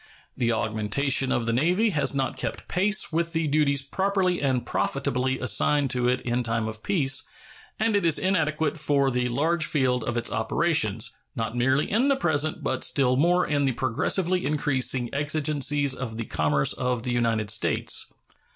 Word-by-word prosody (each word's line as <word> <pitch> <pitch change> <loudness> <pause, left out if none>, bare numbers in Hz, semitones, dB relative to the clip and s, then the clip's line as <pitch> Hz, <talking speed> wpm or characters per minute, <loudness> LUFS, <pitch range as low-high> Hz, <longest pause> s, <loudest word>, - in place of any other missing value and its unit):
The 120 -2 0
augmentation 115 +5 0
of 120 - 0
the 115 - 0
Navy 180 - +2
has 150 -4 0
not 135 -1 -1
kept - - -5
pace 200 -1 +1
with 170 +1 -1
the 165 -1 0
duties 140 -2 +1
properly 190 +3 0
and 130 -3 0
profitably 130 +1 -1
assigned 140 +2 +1
to 125 -1 +1
it 125 +1 +1
in 120 0 -1
time 115 -2 -1
of 110 -1 -7
peace, 140 - +1 0.5
and 220 0 +1
it 205 - +1
is 165 -3 +3
inadequate 160 -4 0
for 140 -3 +1
the 125 0 0
large 155 +7 0
field 130 -5 +1
of 120 - -2
its 120 - -1
operations, 110 -1 0 0.2
not 115 0 -3
merely 130 +4 +1
in 235 +7 +1
the 280 - +3
present, 155 - -1
but 130 0 -2
still 130 -3 +2
more 175 +6 +2
in 145 -1 0
the 135 - +1
progressively 180 +10 0
increasing 135 -4 0
exigencies 145 -1 +1
of 120 -4 -5
the 115 - -4
commerce 75 -5 +1
of 125 -2 -2
the 125 - -2
United 115 -3 0
States. 110 - 0
140 Hz, 170 wpm, -25 LUFS, 120-155 Hz, 0.5 s, is